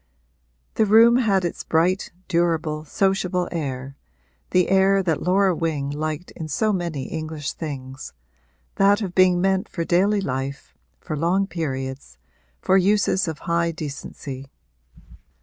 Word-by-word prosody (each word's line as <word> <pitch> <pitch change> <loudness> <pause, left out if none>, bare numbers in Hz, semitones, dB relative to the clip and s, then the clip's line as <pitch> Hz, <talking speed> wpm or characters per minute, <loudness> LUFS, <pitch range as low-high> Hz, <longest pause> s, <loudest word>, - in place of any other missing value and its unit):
The 220 - +2
room 230 +3 +7
had 200 -7 +2
its 170 - -4
bright, 175 +4 +1 0.2
durable, 165 -3 0
sociable 185 0 0
air, 135 -4 -4 0.5
the 180 -1 +2
air 195 +1 +4
that 165 -4 0
Laura 190 0 +2
Wing 155 -4 -2
liked 155 +3 -4
in 160 - -7
so 215 +8 0
many 170 -7 -3
English 155 -1 -5
things 135 -3 -7 0.7
that 200 +2 +4
of 185 -3 -4
being 185 -1 +4
meant 190 +1 +1
for 170 - -3
daily 195 +5 +2
life, 135 -4 -4 0.3
for 155 - -5
long 175 +6 +1
periods, 135 - -5 0.4
for 190 - +3
uses 195 -1 +2
of 160 -2 -3
high 170 -1 +1
decency. 140 -3 -7
170 Hz, 130 wpm, -23 LUFS, 150-190 Hz, 0.7 s, room